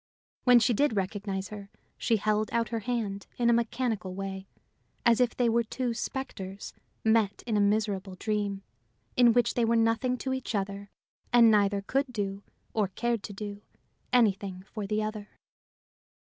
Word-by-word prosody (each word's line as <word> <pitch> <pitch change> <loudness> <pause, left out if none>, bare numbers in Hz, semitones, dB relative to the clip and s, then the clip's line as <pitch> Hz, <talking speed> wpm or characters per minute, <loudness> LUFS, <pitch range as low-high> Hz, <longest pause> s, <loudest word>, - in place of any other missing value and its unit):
When 250 -1 +8
she 235 +2 +3
did 280 0 +2
recognize 195 0 -2
her, 205 -2 -8 0.3
she 225 - +1
held 215 +1 0
out 230 -1 0
her 230 - -2
hand 220 -3 -3
in 235 -1 +3
a - - +5
mechanical 230 -5 -1
way, 195 0 -5 0.6
as 235 0 +5
if 245 -1 +1
they 245 - +3
were 235 +1 +3
two 240 +1 -2
specters 205 -6 -5 0.3
met 220 -2 +2
in 230 -3 -1
a - - +3
miserable 200 -2 0
dream, 200 -1 -2 0.5
in 245 -1 +6
which 240 +1 +2
they 240 - +1
were 230 +1 +3
nothing 230 +3 +2
to 260 +1 -2
each 260 -3 -3
other, 200 0 -3 0.4
and 235 -2 +7
neither 200 -1 +3
could 270 +5 0
do, 200 -3 -3 0.3
or 215 -3 +1
cared 235 +4 -1
to 205 - -7
do, 205 0 -6 0.5
anything 200 -6 +2
for 210 -3 -4
the 215 +1 0
other. 215 -1 -5
215 Hz, 165 wpm, -29 LUFS, 200-235 Hz, 0.6 s, When